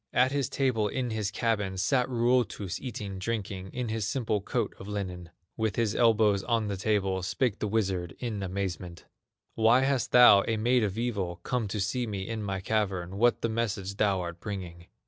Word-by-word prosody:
At 130 +1 +4
his 140 -3 0
table 125 -6 +1
in 125 +2 -2
his 110 -3 -1
cabin 105 -3 -1
Sat 125 +5 +1
Ruotus, 120 -6 0
eating, 100 -6 -5
drinking, 95 -3 -4
In 125 -2 -3
his 110 -2 -1
simple 110 -3 -1
coat - - -2
of 95 - -9
linen. 90 -4 -5 0.3
With 110 -3 0
his 115 -3 +1
elbows 110 -4 +4
on 115 -3 +1
the 100 - -2
table 95 -1 0
Spake 105 +4 -1
the 105 - -1
wizard 95 -5 -1
in 110 -5 -4
amazement: 90 -2 -4 0.5
"Why 115 +3 +4
hast 135 -2 0
thou, 115 -5 +8
a 115 - +1
maid 120 +2 +2
of 100 0 -2
evil, 100 -7 -2
Come 125 -4 -1
to 105 +2 -3
see 115 +5 -1
me 100 -3 -4
in 115 -1 -3
my 95 -2 -3
cavern, 95 -3 -1
What 120 +1 +3
the 115 - +1
message 105 -4 -2
thou 100 -4 +2
art 85 -1 -6
bringing?" 90 -4 -7
105 Hz, 185 wpm, -28 LUFS, 95-115 Hz, 0.5 s, thou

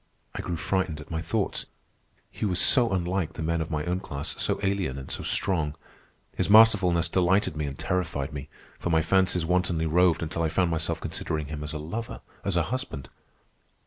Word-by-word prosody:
I - - -4
grew 85 - -3
frightened 85 -1 -1
at 75 +3 -11
my 80 0 -2
thoughts. 100 +5 -2 0.6
He - - -7
was 90 -4 +2
so 120 -4 +6
unlike 90 -2 -1
the 80 - -5
men 85 +1 0
of 80 - -4
my 75 -1 -2
own 90 +1 -1
class, 75 -4 -4
so - - 0
alien 95 -9 0
and 65 -1 -7
so - - -2
strong. 80 -6 +1 0.6
His - - 0
masterfulness 100 -6 +6
delighted 90 0 +2
me 75 -1 -2
and 70 0 -6
terrified 85 -5 -2
me, 70 0 -7 0.3
for - - -3
my 80 -1 +3
fancies 90 -1 +2
wantonly 85 -2 +1
roved 85 +1 +3
until 85 +1 -3
I 80 - +1
found 90 +1 +1
myself 80 0 -1
considering 75 -2 -3
him 75 -1 -5
as 75 - -5
a - - -3
lover, 85 +10 -5 0.2
as 100 -3 0
a 85 - +3
husband. 70 - -4
85 Hz, 195 wpm, -27 LUFS, 75-95 Hz, 0.6 s, so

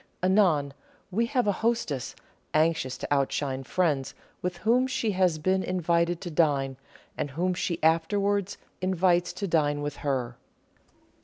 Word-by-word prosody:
Anon, 180 -8 +3 0.4
we 230 +5 +1
have 250 -1 +1
a 205 - +3
hostess, 200 - -1 0.4
anxious 155 -4 +1
to - - -2
outshine 135 -1 -1
friends 145 -3 0 0.3
with 180 -1 -3
whom 240 +6 +2
she 230 -4 -1
has 185 -4 +2
been 185 +5 +1
invited 170 -2 0
to 175 - -5
dine, 140 -4 +1 0.4
and 145 - -3
whom 175 +6 -1
she 175 -1 -2
afterwards 200 +5 +1 0.2
invites 180 -1 +2
to 195 +2 -3
dine 145 -4 +1
with 145 -1 -4
her. 125 -4 -2
175 Hz, 140 wpm, -27 LUFS, 145-190 Hz, 0.4 s, Anon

